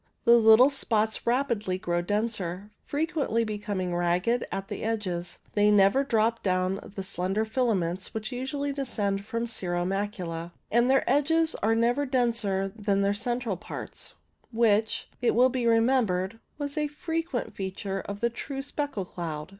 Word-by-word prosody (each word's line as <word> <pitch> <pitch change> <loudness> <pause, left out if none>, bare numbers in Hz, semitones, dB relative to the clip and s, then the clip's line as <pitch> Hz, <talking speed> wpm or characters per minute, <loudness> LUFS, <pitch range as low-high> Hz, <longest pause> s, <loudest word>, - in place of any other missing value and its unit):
The 235 - +6
little 230 +4 +7
spots 220 -6 0
rapidly 235 -7 +1
grow 175 -1 -1
denser, 205 -1 -2
frequently 290 -6 0
becoming 205 -4 -3
ragged 180 +8 +1
at 195 0 -4
the 205 -1 -5
edges; 190 -6 -2 0.2
they 205 0 +4
never 205 +6 +5
drop 230 -3 +1
down 185 0 0 0.2
the 195 - -4
slender 190 +3 -1
filaments 200 -7 -1
which 215 -1 -5
usually 280 +3 -3
descend 205 -8 -1
from 230 +2 -2
cirro 175 -6 -2
macula, 180 -4 -3 0.2
and 235 +2 +4
their 270 0 +3
edges 315 +5 +3
are 225 +2 +1
never 240 +5 +2
denser 230 -7 0
than 200 -2 0
their 200 0 +2
central 235 -1 -2
parts, - - -8 0.4
which, 220 -2 +2
it 240 - +2
will 250 +2 +6
be 250 -2 -1
remembered, 225 -4 +2 0.2
was 290 +1 -3
a 300 - +1
frequent 325 -2 -3
feature 195 0 -4
of 200 0 -7
the 235 0 +1
true 270 +3 -5
speckle 285 -8 -3
cloud. 165 -3 -5
220 Hz, 150 wpm, -27 LUFS, 195-245 Hz, 0.4 s, little